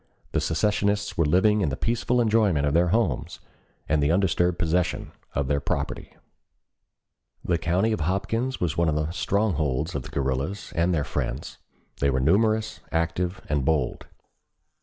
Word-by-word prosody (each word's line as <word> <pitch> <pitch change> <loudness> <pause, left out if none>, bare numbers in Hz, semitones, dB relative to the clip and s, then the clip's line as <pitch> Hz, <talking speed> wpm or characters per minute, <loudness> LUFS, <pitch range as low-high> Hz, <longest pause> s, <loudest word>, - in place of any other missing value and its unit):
The - - 0
secessionists 105 -1 0
were 85 -5 +2
living 105 +6 +3
in 80 - +1
the 65 - -2
peaceful 120 +2 0
enjoyment 105 -10 +3
of 70 - +1
their 85 +2 +4
homes, 95 - 0 0.5
and 75 0 +2
the 70 - +2
undisturbed 90 -1 +2
possession 85 +1 0 0.2
of 70 -2 0
their 70 +1 +1
property. - - -3 1.3
"The 85 -2 +1
county 90 +7 +1
of 110 - -1
Hopkins 115 +10 -1
was 85 -5 -1
one 85 -1 +2
of 75 - 0
the 75 +1 -1
strongholds 85 -6 0
of 70 - -2
the - - -10
guerrillas 70 +8 -2
and 85 +2 +2
their 80 -4 +1
friends; 70 - -4 0.4
they 70 - +2
were 65 -1 +1
numerous, 110 - +2
active, 85 +3 -1
and 70 -2 0
bold. 75 -3 0
85 Hz, 160 wpm, -25 LUFS, 75-100 Hz, 1.3 s, their